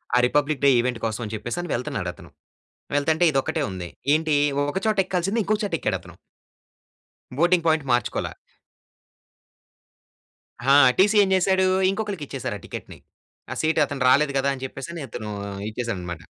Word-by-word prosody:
ఆ - - +5
republic 145 +2 +1
day - - +7
event 120 -1 -1
కోసం 110 +1 -3
అని 105 - -7
చెప్పేసి 120 +7 -5
అని 175 - -7
వెళ్తున్నాడతను. 100 -7 -4 0.7
వెళ్తుంటే 160 +4 +2
ఇదొక్కటే 135 -2 0
ఉంది. 90 -2 -6 0.3
ఏంటి 155 -1 +1 0.4
ఒక 190 - -2
చోట 215 -1 +2
ఎక్కాల్సింది 190 +5 0
ఇంకో 215 - +1
చోట 195 -5 -3
ఎక్కాడతను. 90 - -3 1.3
Boarding 175 0 +3
point 155 -3 +2
మార్చుకోలే. 120 0 0 2.3
ఆ! 135 +2 +2 0.3
టీసీ 205 +3 +4
ఏం 190 - 0
చేసాడు? 190 0 +3 0.3
ఇంకొకళ్ళకి 200 -5 -4
ఇచ్చేసారు 130 -6 -4
ఆ - - -20
టికెట్‌ని. - - -9 0.5
ఆ - - -1
సీట్ 160 0 +1
అతను 140 -1 -6
రాలేదు 140 +2 +4
కదా! 140 +1 +1
అని 130 - -9
చెప్పేసి 170 +5 -7
అతను 110 -2 -6 0.4
ఇచ్చేసాడన్నమాట. 90 -8 -5
140 Hz, 145 wpm, -24 LUFS, 120-175 Hz, 2.3 s, day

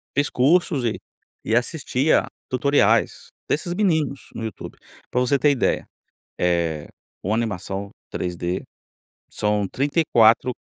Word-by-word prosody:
Fiz 145 +1 +2
cursos 145 -1 +2
e 110 - -1 0.5
e 115 - +2
assistia 140 +2 +1
a - - -9 0.2
tutoriais, 140 +3 +2 0.2
desses 175 +4 -1
meninos 160 -8 0
no 115 - -5
YouTube. 110 - -8 0.3
Pra 125 - +1
você 125 +3 +2
ter 145 +2 +3
ideia, 135 - 0 0.5
eh, 85 -3 0 0.3
com 100 - -2
animação 100 -3 -2 0.2
3D, 90 0 -3 0.7
são 105 -1 0
34 130 - +3
125 Hz, 120 wpm, -23 LUFS, 100-145 Hz, 0.7 s, ter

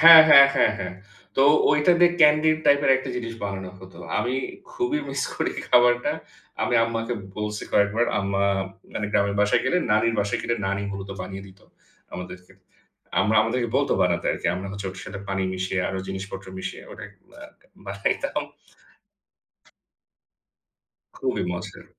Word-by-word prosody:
হ্যাঁ, 165 0 +11
হ্যাঁ, 140 -2 +9
হ্যাঁ, 120 - +3
হ্যাঁ। 90 -2 -5 0.4
তো, 135 - +4 0.3
ঐটা 150 +4 +4
দিয়ে 175 0 +6
ক্যান্ডি 150 +1 +5
টাইপের 140 -1 +4
একটা 130 0 -5
জিনিস 115 -1 -5
বানানো 95 -2 -5
হতো। 95 0 -14 0.2
আমি 125 +2 -1 0.4
খুবই 370 -9 -1
মিস 135 0 -2
করি - - -2 0.2
খাবারটা। 120 0 +4 0.5
আমি 120 - 0
আম্মাকে 115 +1 -3 0.2
বলছি 105 0 -4
কয়েকবার 105 +4 +2
আম্মা, 100 0 0 0.5
মানে 105 - -2
গ্রামের 100 0 +1
বাসায় 105 - +2
গেলে, 180 - +2 0.2
নানির 115 +2 +2
বাসায় 100 0 -1
গেলে 120 0 -1
নানি 100 +1 -2
মূলত 100 0 -7
বানিয়ে 95 +1 -7
দিত 95 0 -17 0.5
আমাদেরকে। 90 +1 -9 0.7
আমরা 110 +1 +2
আমাদেরকে 120 +1 -1
বলত 140 - +1
বানাতে 85 -1 0
আরকি - - -4
আমরা 95 +2 -5
হচ্ছে 100 0 -6
ওটার 95 0 -9
সাথে 100 +1 -7
পানি 95 -1 -1
মিশিয়ে, 95 0 -3
আরও 95 - -4
জিনিসপত্র 95 0 -6
মিশিয়ে - - -6
মানে - - -9 0.4
আ - - -9 0.4
বানাইতাম। 100 0 -2 2.7
খুবই - - -2
মজার। 90 0 -8
105 Hz, 145 wpm, -24 LUFS, 95-125 Hz, 2.7 s, হ্যাঁ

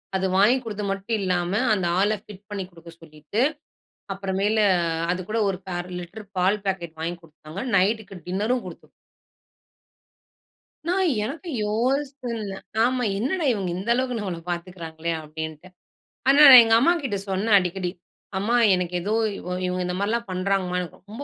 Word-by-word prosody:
அது 190 0 0
வாங்கி 210 +7 +5
கொடுத்து 210 -3 -5
மட்டும் 195 +4 -2
இல்லாம, 180 -2 0 0.2
அந்த 190 -4 0
ஆள 200 +2 +3
ஃபிட் 205 -2 -13
பண்ணி 205 -2 -4
குடுக்க 170 0 -14
சொல்லிட்டு, 155 +6 -4 0.7
அப்பறம் 190 -1 -3
மேல, 210 +2 +2 0.5
அது 180 +1 -1
கூட 220 +2 -1
ஒரு 190 -2 -2 0.2
1/2 175 - -5
லிட்டர் 205 +5 -10
பால் 190 +3 +3
பாக்கெட் 175 -4 -3
வாங்கி 170 +2 -3
கொடுத்தாங்க. 155 +2 -9
நைட்டுக்கு 200 +1 +1
டின்னரும் 215 +7 0
குடுத்து - - -10 2.0
நான் 370 0 +2
எனக்கும் 310 - -5
யோசனல்ல 240 -2 -2 0.3
ஆமா. 250 0 0 0.2
என்னடா 315 - -1
இவங்க 195 -4 -2
இந்த 195 +5 -5
அளவுக்கு 250 0 -1
நம்மள 185 -5 -4
பாத்துகிறாங்களே 170 -2 -5
அப்டின்டு. 160 +2 -7 0.6
ஆனா, 275 +1 +6
நான் 255 -2 +12
எங்க 225 0 +4
அம்மாகிட்ட 275 -6 +1
சொன்னேன் 200 +3 +2
அடிக்கடி 180 0 -2 0.5
அம்மா 215 +5 +1 0.2
எனக்கு 180 -1 -3
ஏதோ 200 +4 -3 0.2
இவ 180 - -9 0.2
இவங்க 180 0 -1
இந்த 180 - -2
மாரிலாம் 230 +4 -1
பண்றங்கமா, 185 0 0
எனக்கு 180 -2 -6
ரொம்ப 225 +7 -7
195 Hz, 145 wpm, -24 LUFS, 180-230 Hz, 2.0 s, நான்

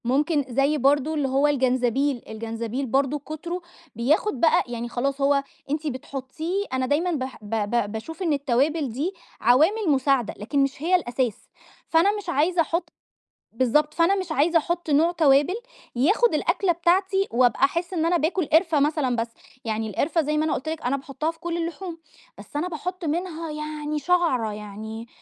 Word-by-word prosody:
ممكن 285 +4 +1
زي 275 +5 +2
برضه 285 +3 +2
اللي 290 -3 0
هو 270 +2 +3
الجنزبيل، 260 -1 +1
الجنزبيل 230 +3 -4
برضه 275 +3 +1
كتره 325 +5 -6 0.3
بياخد 270 - +1
بقى 335 +4 +4
يعني 240 0 -5
خلاص 275 +3 -2
هو 275 0 +3 0.3
أنتِ 305 +2 -2
بتحطّيه 280 +8 -4
أنا 260 0 0
دايمًا 315 +7 +1
بح 260 -5 -4
ب 205 - -10 0.2
ب 235 -3 0
باشوف 275 - -7
إن 325 -4 +2
التوابل 280 +2 +1
دي 290 - -2 0.3
عوامل 325 - +4
مساعدة، 270 -4 +2
لكن 240 +8 -2
مش 275 0 -3
هي 350 +4 +3
الأساس، 245 - -2 0.4
فأنا 390 +6 +3
مش 405 -4 -6
عايزة 335 +3 +2
أحطّ 335 +2 -1 0.6
بالضبط 260 +6 +2
فأنا 340 +4 +3
مش 370 -4 -4
عايزة 315 +3 +3
أحطّ 340 +1 -2
نوع 310 +4 +4
توابل 295 -1 +4 0.4
ياخد 400 - +3
الأكلة 350 +4 +1
بتاعتي 375 +3 +2
وأبقى 245 +1 +3
أحسّ 340 +5 -2
إن 325 -3 0
أنا 345 +1 +3
باكل 340 +2 0
قرفة 320 0 +3
مثلًا 285 -3 +1
بس، 230 0 -2 0.4
يعني 220 0 -2
القرفة- 320 - +1
زي 300 +1 0
ما 310 - +2
أنا 315 - 0
قلت 315 - -3
لكِ- 320 0 -4
أنا 275 +2 +1
باحطّها 275 +3 -3
في 325 - -23
كل 340 0 -3
اللحوم، 340 +1 -4 0.4
بس - - -14
أنا 305 +5 0
باحطّ 360 +1 -5
منها 330 0 -3
يعني 300 0 -4
شعرة 290 -10 +1
يعني 215 +2 -7
295 Hz, 170 wpm, -24 LUFS, 260-335 Hz, 0.6 s, بقى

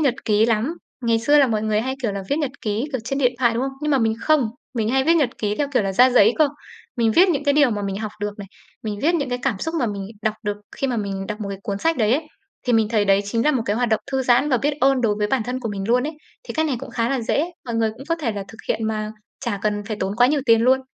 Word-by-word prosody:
nhật 275 -5 +2
ký 215 0 +3
lắm. 235 +8 0 0.2
Ngày 230 -2 +2
xưa 290 +6 +4
là 280 - +6
mọi 220 -3 -1
người 215 -1 +1
hay, 260 +3 -2
kiểu 220 -5 0
là, 200 -1 -4
viết 285 - +2
nhật 290 -5 -1
ký, 215 +1 -1
kiểu, 260 - -1
trên 275 +4 -2
điện 250 -3 +3
thoại, 235 -3 +3
đúng 235 - 0
không? 270 0 -2
Nhưng 300 - 0
mà 275 - +3
mình 225 -1 +1
không, 295 -6 +3 0.3
mình 220 -2 0
hay 265 +2 +2
viết 330 +3 +4
nhật 285 -7 +2
ký 210 -1 -1
theo, 290 - 0
kiểu 250 - +3
là, 195 -1 -1
ra 250 +6 +6
giấy 225 -2 +5
cơ. 310 -2 +5 0.5
Mình 230 -2 +2
viết 370 - +6
những 290 -5 0
cái 285 - +3
điều 290 -3 +5
mà 205 -2 -2
mình 195 -1 -3
học 215 0 -4
được 205 0 -4
này, 200 - -7 0.4
mình 210 -2 -4
viết 330 +4 +3
những 285 -5 0
cái 245 0 -2
cảm 250 -8 0
xúc 320 - -3
mà 245 - +1
mình 200 -2 -4 0.2
đọc 215 -1 0
được 205 -2 -2 0.2
khi 275 - -1
mà 250 - -1
mình 195 -2 -3
đọc 210 +2 -5
một 200 - -4
cái 195 - -5
cuốn 200 -1 -3
sách 325 +7 +1
đấy 220 -1 +2
ấy, 305 +3 -2 0.4
thì 245 - +2
mình 225 -2 +3
thấy 215 -2 +2
đấy 195 0 +4
chính 230 +4 -1
là 300 - +5
một 255 -5 0
cái 205 - 0
hoạt 245 0 +1
động 220 -1 +1
thư 265 0 +1
giãn 250 +4 +3
và 260 - +3
biết 285 +5 0
ơn 270 -1 +4
đối 225 -4 +2
với 210 - +1
bản 250 +3 0
thân 250 +3 -4
của 230 - -3
mình 200 -2 -4
luôn 245 +1 +3
ấy. 310 - -4 0.3
Thì - - -8
cách 315 0 +1
này 275 -5 -1
cũng 270 - -8
khá 230 -1 0
là 270 -1 0
dễ, 280 +6 +1 0.2
mọi 235 - -3
người 225 -1 +1
cũng 225 +5 -12
có 330 - +2
thể 275 -9 -2
là 200 -1 -4
thực 225 - -13
hiện 220 +1 0
mà 215 -1 -2 0.3
chả 230 -5 -2
cần 210 -1 0
phải 215 +1 -4
tốn 195 +2 -2
quá 245 +1 +6
nhiều 290 +2 +1
tiền 230 -1 +5
luôn. 260 +2 +4
235 Hz, 320 wpm, -22 LUFS, 215-270 Hz, 0.5 s, là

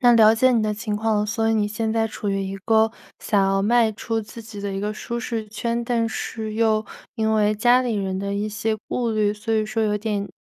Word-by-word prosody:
那 245 -1 +6
了 220 -1 +7
解 255 +3 +4
你 225 -2 +2
的 210 0 0
情 210 0 -3
况 220 0 +1
了， 210 - +1
所 225 +1 0
以 225 - +2
你 210 -1 +2
现 220 +1 -2
在 225 0 +1
处 205 -1 -5
于 195 0 0
一 195 0 -4
个 220 +2 +3 0.3
想 205 -2 +2
要 195 0 +2
迈 230 +1 +4
出 225 +1 -2
自 220 +2 -10
己 215 -2 -9
的 200 0 -3
一 195 - -3
个 210 +1 -2
舒 235 +2 -5
适 225 -2 -3
圈， 235 +2 -2
但 235 -1 0
是 220 -1 -4
又 220 -1 +2 0.3
因 220 -2 0
为 210 -1 +3
家 245 +4 +4
里 240 -3 -1
人 190 -2 -2
的 200 0 -3
一 210 +1 -1
些 215 +1 -1
顾 240 -2 -1
虑， 210 -1 +1
所 215 +2 -4
以 215 0 +2
说 225 +1 -1
有 210 -1 +1
点， 205 -1 -2
220 Hz, 270 characters per minute, -23 LUFS, 210-225 Hz, 0.3 s, 了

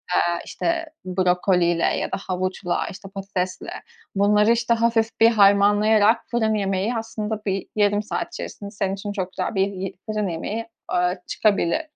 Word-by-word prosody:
eee, 175 0 +1
işte, 335 -1 -1 0.2
brokoliyle 180 -2 +2
ya - - 0
da - - -1
havuçla, 185 -1 -1
işte, 195 0 -10
patatesle 190 -2 -4 0.5
bunları, 210 +2 +4
işte, 235 0 +2
hafif 230 -1 +1
bir 225 - +7
harmanlayarak 205 +2 +4
fırın 220 -2 +1
yemeği 200 +2 0
aslında 220 -1 -3
bir 195 -1 -2
yarım 205 0 +2
saat 215 - -3
içerisinde 200 - -7
senin 195 -2 -2
için 205 +1 -5
çok 190 -2 -3
güzel - - -3
bir 195 0 +3
yı 190 -1 -5
fırın 215 -2 -1
yemeği, 205 +7 -4 0.3
ııı, 180 +1 +1
çıkabilir. 205 - +1
200 Hz, 150 wpm, -23 LUFS, 185-220 Hz, 0.5 s, bir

